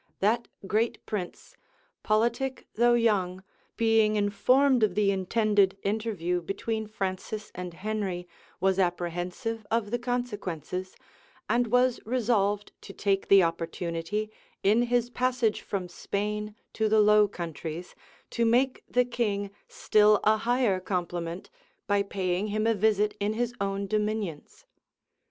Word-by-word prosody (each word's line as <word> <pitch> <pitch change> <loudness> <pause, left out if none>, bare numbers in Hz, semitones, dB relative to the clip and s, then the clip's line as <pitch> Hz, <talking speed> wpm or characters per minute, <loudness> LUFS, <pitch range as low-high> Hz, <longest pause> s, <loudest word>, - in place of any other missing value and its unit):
That 225 +4 +1 0.2
great 225 +4 0
prince, 190 -5 -6 0.5
politic 235 +5 0
though 240 +1 +4
young, 190 -6 +1 0.3
being 225 -2 +3
informed 250 +6 +3
of 210 -4 +2
the 205 -1 +3
intended 200 0 +2
interview 200 -5 -1
between 220 +5 -3
Francis 210 +1 -4
and 180 -1 -6
Henry, 190 -2 -3 0.3
was 190 +1 +2
apprehensive 180 +6 -2
of 225 -2 0
the 240 - 0
consequences; 200 - -4 0.5
and 240 +2 +2
was 250 +2 +3
resolved 210 -4 0
to 195 - -10
take 195 -1 0
the 195 -1 +7
opportunity, 170 +5 -2 0.3
in 210 +4 +4
his 240 0 +1
passage 250 -3 0
from 190 -3 -4
Spain 210 +4 -3 0.2
to 220 -1 0
the 220 0 +4
Low 210 0 +6
Countries, 170 -2 -6 0.4
to 235 - 0
make 250 +3 +2
the 250 0 +3
king 205 -5 -2 0.2
still 210 -1 +4
a 215 +1 +4
higher 230 -3 +1
compliment, 175 -2 -4 0.3
by 205 -1 +2
paying 190 0 -1
him 215 +1 -1
a 225 - +4
visit 210 0 +2
in 205 +1 0
his 240 +1 -1
own 200 0 -1
dominions. 210 -5 -3
210 Hz, 130 wpm, -28 LUFS, 190-225 Hz, 0.5 s, the